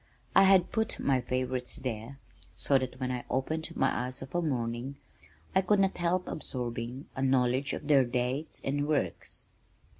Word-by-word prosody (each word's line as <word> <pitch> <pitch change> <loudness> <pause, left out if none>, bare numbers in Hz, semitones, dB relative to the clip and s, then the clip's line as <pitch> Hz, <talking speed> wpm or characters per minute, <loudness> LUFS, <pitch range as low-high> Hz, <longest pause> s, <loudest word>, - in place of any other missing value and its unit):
I 195 - +8
had 190 -2 +5
put 220 0 0
my 130 -2 +2
favorites 125 0 -2
there 120 +1 -5 0.4
so 135 -1 +3
that 130 0 -5
when 130 -1 -1
I 125 -1 -3
opened 155 +5 -1
my 125 -2 +1
eyes 130 +1 -7
of 135 - -11
a 175 - +1
morning, 125 -3 -2 0.6
I 190 - +5
could 205 +2 +3
not 195 -1 +3
help 180 +1 0
absorbing 125 -1 -4
a 130 - -3
knowledge 130 0 +2
of 150 - -5
their 140 -3 +6
dates 125 +4 -2
and 145 +2 0
works. 150 -2 -1
130 Hz, 170 wpm, -30 LUFS, 125-155 Hz, 0.6 s, I